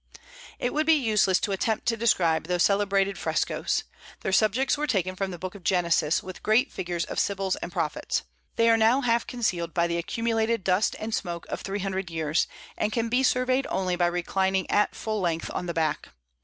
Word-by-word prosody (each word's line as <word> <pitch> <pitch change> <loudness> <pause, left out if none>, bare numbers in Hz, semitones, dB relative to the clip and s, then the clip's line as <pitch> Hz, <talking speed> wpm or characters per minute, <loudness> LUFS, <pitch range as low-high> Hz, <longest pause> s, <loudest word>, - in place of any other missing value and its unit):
It 245 - -2
would 310 +1 0
be 320 - +7
useless 210 -8 +2
to 205 - -1
attempt 215 +3 -1
to 235 - +2
describe 175 -9 +2
those 180 -1 +2
celebrated 200 -1 +2
frescos. - - -1 0.4
Their - - -2
subjects 220 +7 +3
were 300 +1 -2
taken 185 - 0
from 195 +1 -2
the 180 - -6
Book 185 +2 -6
of 200 -3 -12
Genesis, 170 -3 +2
with 185 -1 -9
great 230 +6 +2
figures 175 -1 -3
of - - -3
sibyls 195 -1 0
and - - -6
prophets. - - -2 0.3
They 230 - +3
are 225 - +5
now 225 +5 +4
half 235 -2 +1
concealed 180 -9 -2
by 170 -1 +3
the 170 0 -1
accumulated 225 +3 -1
dust 185 +3 +2
and 220 +1 -5
smoke 170 -4 -3
of - - -4
three 195 +1 -3
hundred 190 -1 -3
years, 160 -1 0 0.3
and 210 - -1
can 230 0 -1
be 250 +3 +2
surveyed 255 +1 +2
only 185 -1 0
by 175 0 +2
reclining 190 +2 0
at 210 - +2
full 215 -2 -3
length 165 -2 -1
on 180 - -3
the - - -1
back. 155 -2 -1
195 Hz, 200 wpm, -26 LUFS, 175-225 Hz, 0.4 s, be